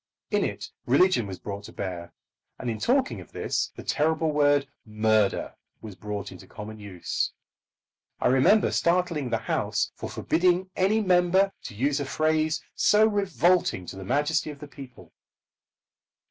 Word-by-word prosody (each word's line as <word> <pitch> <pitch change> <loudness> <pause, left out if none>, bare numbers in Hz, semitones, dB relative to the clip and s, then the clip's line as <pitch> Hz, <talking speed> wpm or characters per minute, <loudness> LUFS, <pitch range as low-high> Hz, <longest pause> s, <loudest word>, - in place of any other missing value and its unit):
In - - +2
it - - -4 0.2
religion 140 - +3
was 95 -1 -6
brought 100 +1 -7
to - - -10
bear; 90 -3 -6 0.5
and 125 - -3
in 110 - -5
talking 260 +2 +1
of - - -16
this - - -2
the - - -9
terrible 160 +1 +1
word 145 -1 +3 0.2
"murder" 110 -1 +1 0.3
was 110 -2 -9
brought 105 0 -5
into 95 0 -12
common 110 +1 -9
use. 100 -4 -3 0.9
I - - +2
remember 135 - +4
startling 170 -6 +1
the 115 - +1
House 110 - -1
by - - -3
forbidding 180 +2 +1
any 205 +4 +2
member 185 0 +3
to - - -7
use 140 +6 0
a 145 - -2
phrase 155 +2 0
so 210 +1 +4
revolting 185 - +1
to 95 - -8
the 95 - -8
majesty 150 - 0
of 150 - -8
the 150 +1 -10
people. 135 -3 -13
145 Hz, 155 wpm, -26 LUFS, 110-180 Hz, 0.9 s, remember